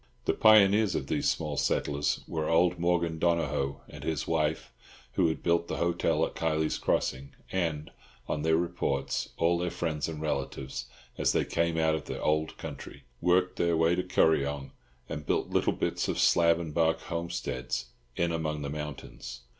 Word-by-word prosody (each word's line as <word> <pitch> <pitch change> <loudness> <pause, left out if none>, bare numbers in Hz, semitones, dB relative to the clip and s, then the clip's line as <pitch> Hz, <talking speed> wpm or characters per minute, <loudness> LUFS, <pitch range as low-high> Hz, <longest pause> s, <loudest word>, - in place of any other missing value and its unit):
The - - +2
pioneers 105 -1 +5
of - - -1
these - - 0
small 75 -3 -2
settlers 70 0 0
were 80 -1 -2
old 85 +1 +3
Morgan 85 -2 +1
Donohoe 75 -5 0
and - - -10
his 75 -5 -2
wife, 80 -1 -1 0.4
who 85 +7 +2
had 80 - -2
built 85 0 +2
the - - -3
hotel 85 0 +1
at - - -7
Kiley's 80 -1 0
Crossing; 65 +1 -1 0.2
and, 80 -4 -1 0.4
on 75 - -2
their 80 +1 +3
reports, 80 -6 -1
all 85 +1 +2
their 90 0 -1
friends 80 -3 -2
and 80 -2 -6
relatives, 70 -3 -3 0.3
as - - +2
they - - +2
came 85 0 0
out 80 -1 +3
of 80 - -3
the - - -5
"ould 75 +1 +1
country," - - -8 0.2
worked 90 +1 +2
their 85 -1 +2
way 80 +1 +3
to 90 - +1
Kuryong, 70 -6 +1 0.4
and 75 - -5
built - - 0
little - - +2
bits - - -1
of - - -1
slab 85 -1 +4
and 80 -3 -5
bark 80 0 +2
homesteads 65 -8 -4 0.2
in 85 -1 +1
among 80 -2 -2
the 70 - -4
mountains. 70 -5 -7
80 Hz, 170 wpm, -29 LUFS, 75-85 Hz, 0.4 s, pioneers